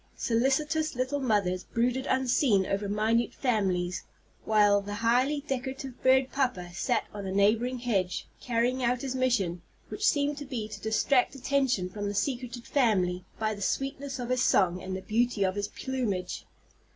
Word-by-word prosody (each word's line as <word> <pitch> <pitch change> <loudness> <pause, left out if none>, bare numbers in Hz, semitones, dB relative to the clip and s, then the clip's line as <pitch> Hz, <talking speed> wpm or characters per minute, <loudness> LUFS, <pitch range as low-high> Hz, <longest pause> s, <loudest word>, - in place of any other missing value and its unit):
Solicitous 295 +6 +1
little 260 +3 -1
mothers 200 -8 +1
brooded 250 +3 -1
unseen 250 -6 +2
over 200 +1 -2
minute 220 +3 +1
families, 190 -8 0 0.4
while 205 -2 +4
the 205 +1 -5
highly 250 +7 +2
decorative 265 -2 -5
bird 260 0 +4
papa 195 -11 -1
sat 240 +7 0
on 200 -2 -5
a - - -3
neighboring 220 +6 +2
hedge, 200 -7 -1
carrying 245 +2 0
out 245 +1 +1
his 265 -2 -2
mission, 230 -10 0 0.3
which 415 - -6
seemed 290 0 +1
to 290 - -6
be 245 -6 -4
to 210 -2 -9
distract 245 +5 +2
attention 270 -8 +1
from 205 +2 -5
the 205 - -3
secreted 245 0 -2
family 185 -9 +1
by 215 0 0
the 205 - -9
sweetness 270 +5 -2
of 245 -1 -5
his 255 0 +1
song 180 -2 +3
and 185 0 -4
the 190 - -9
beauty 230 -1 +1
of 185 - 0
his 205 +1 -2
plumage. 235 -8 -3
235 Hz, 165 wpm, -28 LUFS, 200-260 Hz, 0.4 s, while